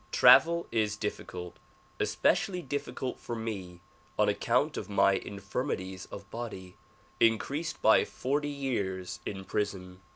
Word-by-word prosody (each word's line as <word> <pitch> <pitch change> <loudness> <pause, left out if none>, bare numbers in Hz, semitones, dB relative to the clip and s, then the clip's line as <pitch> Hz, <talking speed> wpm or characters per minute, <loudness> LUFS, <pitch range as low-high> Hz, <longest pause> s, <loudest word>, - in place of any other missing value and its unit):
Travel 170 +1 +7
is 105 -2 +1
difficult, 90 -4 -5 0.4
especially 180 -3 +1
difficult 140 -2 -4
for 120 - -5
me 95 -6 -5 0.4
on - - +4
account - - +1
of - - -5
my 100 -1 +4
infirmities 95 -1 -4
of 100 -1 -9
body, 105 -6 -6 0.4
increased 140 +8 +1
by 110 - +6
forty 145 +3 -2
years 100 -10 -3
in 95 -1 -5
prison. 95 -3 -3
105 Hz, 120 wpm, -30 LUFS, 95-135 Hz, 0.4 s, Travel